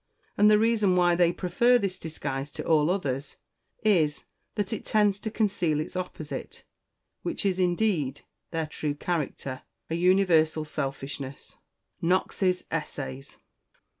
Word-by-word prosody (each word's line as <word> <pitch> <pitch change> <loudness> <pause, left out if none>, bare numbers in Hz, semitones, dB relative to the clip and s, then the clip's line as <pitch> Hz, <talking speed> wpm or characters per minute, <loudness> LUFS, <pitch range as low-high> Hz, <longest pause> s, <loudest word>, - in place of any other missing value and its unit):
And 210 +1 +6
the 210 - +6
reason 215 -4 +3
why 175 -1 +4
they 170 0 +4
prefer 235 +8 +3
this 195 -5 -2
disguise 140 -3 -4
to - - -6
all 155 -1 +3
others, 145 -7 -2 0.5
is, 165 -9 +2 0.3
that 205 0 -1
it - - -4
tends 205 -2 +2
to 220 - -3
conceal 195 -8 +1
its 155 - -5
opposite, 180 -4 -6 0.6
which 340 -11 -3
is, 190 -2 +1
indeed, 175 -7 +1 0.3
their 165 -1 -1
true 150 -1 -3
character 145 -5 -3 0.3
an 165 - 0
universal 170 -4 +3
selfishness." 135 -2 -5 0.4
KNOX'S 185 +1 +1
_Essays. 135 -4 -5
175 Hz, 130 wpm, -27 LUFS, 150-195 Hz, 0.6 s, And